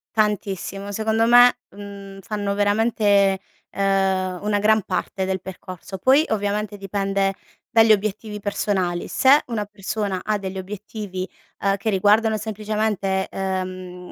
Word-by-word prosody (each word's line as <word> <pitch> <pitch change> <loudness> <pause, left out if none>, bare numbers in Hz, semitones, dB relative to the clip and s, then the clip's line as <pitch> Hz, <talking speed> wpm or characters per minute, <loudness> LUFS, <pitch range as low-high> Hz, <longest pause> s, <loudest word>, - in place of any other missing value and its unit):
Tantissimo. 200 -2 -1
Secondo 220 +2 +1
me, 245 +1 +7
mhmm, 200 -1 -10
fanno 205 +1 -3
veramente, 205 -1 +2 0.3
ehm, 190 -2 0
una 210 -1 +1
gran 215 0 +3
parte 190 - -3
del 190 0 -1
percorso 185 0 -8
poi 270 - +4
ovviamente 210 0 -1
dipende 195 0 -1 0.4
dagli 225 -2 +6
obiettivi 210 +1 -3
personali. 190 -4 -1
Se 275 +3 +5
una 225 -3 -2
persona 200 -1 -3
ha 215 -1 0
degli 190 -1 -6
obiettivi, 195 -1 -6 0.4
uhm, 195 0 +1
che 200 +3 -2
riguardano 215 +3 +3
semplicemente, 210 -2 -1
ehm, 185 -1 -5
200 Hz, 125 wpm, -22 LUFS, 190-215 Hz, 0.4 s, me